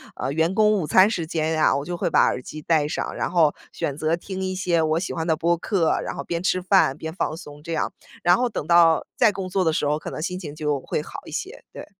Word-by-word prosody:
呃， 130 - -3
员 160 +5 +1
工 215 0 +4
午 190 -8 0
餐 190 +2 +6
时 180 -7 -2
间 160 -1 -1
呀， 155 -1 +3
我 140 - -2
就 175 +3 -5
会 - - -1
把 - - +4
耳 - - +1
机 155 +4 -9
戴 150 -1 +2
上， - - -3
然 - - -2
后 165 -4 +3 0.2
选 140 - -3
择 155 +2 +1
听 190 +2 -7
一 185 0 -2
些 175 -3 +1
我 155 0 +1
喜 180 - -4
欢 165 0 -3
的 160 - +3
播 170 +2 +1
客， 175 -2 +1
然 - - -4
后 - - -5
边 170 -1 -3
吃 185 0 +1
饭、 185 -7 +3
边 160 +1 -6
放 160 - -2
松 150 -3 -11
这 165 +1 -5
样。 160 - -1 0.3
然 175 +1 +5
后 250 - +1
等 210 - -4
到 165 -1 +5
再 225 -4 +4
工 195 -2 -5
作 185 0 0
的 160 - +2
时 155 - 0
候， 150 +1 +1
可 - - -7
能 - - -5
心 180 +2 -3
情 150 -5 -8
就 150 -2 -1
会 140 - -3
好 - - -8
一 - - -10
些， - - -6
对。 - - -8
165 Hz, 295 characters per minute, -23 LUFS, 155-185 Hz, 0.3 s, 餐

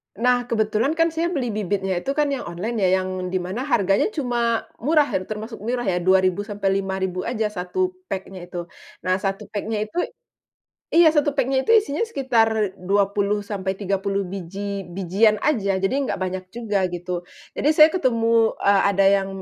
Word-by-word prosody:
Nah, 245 +2 +2
kebetulan 220 +4 +1
kan 330 0 +2
saya 325 +1 -1
beli 255 -5 -1
bibitnya 195 -3 -1
itu 275 +10 -3
kan 295 -1 +1
yang 275 -3 -3
online 200 +7 -4
yang 185 -1 +2 0.3
di 185 - 0
mana 200 +9 -4
harganya 200 -8 +2
cuma 240 -5 0 0.2
murah, 295 +3 +2 0.2
termasuk 220 +2 -6
murah 245 +4 -2
ya 185 -6 0
Rp2.000 185 +2 +2
sampai 200 -2 0
Rp5.000 190 -1 -3
aja 220 -3 -1
1 210 - -2 0.2
pack-nya 190 - -6
itu. 175 0 -5 0.4
Nah, 185 0 +1
1 195 +1 -4
pack-nya 210 0 -2
itu 215 +10 -5 0.9
iya, 330 -2 +6
1 295 -1 +3
pack-nya 270 -1 +1
itu - - -2
isinya 300 -6 -2
sekitar 225 - +1
20 200 +2 +1
sampai 195 -2 -3
30 195 0 -1
biji-bijian 195 +2 -1
aja, 200 -10 +1
jadi 195 +6 0
nggak 275 -6 -1
banyak 185 0 -3
juga 205 -5 -1
gitu. 175 0 -4 0.3
Jadi 290 - 0
saya 310 0 +7
ketemu, 230 -7 +2
eee, 200 -1 +4
ada 195 0 +2
yang, 195 0 +3
205 Hz, 160 wpm, -23 LUFS, 190-245 Hz, 0.9 s, saya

